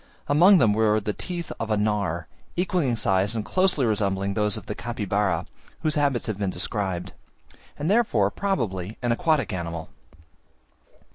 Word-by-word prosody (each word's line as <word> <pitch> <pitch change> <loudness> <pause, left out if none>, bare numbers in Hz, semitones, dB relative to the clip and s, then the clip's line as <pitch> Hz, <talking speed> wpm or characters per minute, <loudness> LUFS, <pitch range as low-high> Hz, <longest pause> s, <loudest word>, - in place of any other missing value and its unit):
Among 175 +7 +6
them 115 -9 +4
were 110 0 +3
the 105 0 -3
teeth 175 - -5
of 115 - -3
a 105 - +2
gnawer, 100 -6 0 0.3
equalling 180 -5 +1
in 120 - +1
size 100 0 +1
and 110 -2 -2
closely 185 -8 +2
resembling 100 -3 0
those 105 -1 +1
of - - -9
the - - -4
Capybara, 105 -4 -1 0.4
whose 155 -2 +1
habits 145 -5 +1
have 105 -3 -3
been 100 -2 0
described; 95 0 -3 0.6
and 145 - -3
therefore, 175 - +3
probably, 110 - -2
an 120 - +1
aquatic 150 - +1
animal. 85 -2 -4
110 Hz, 155 wpm, -25 LUFS, 100-145 Hz, 0.6 s, Among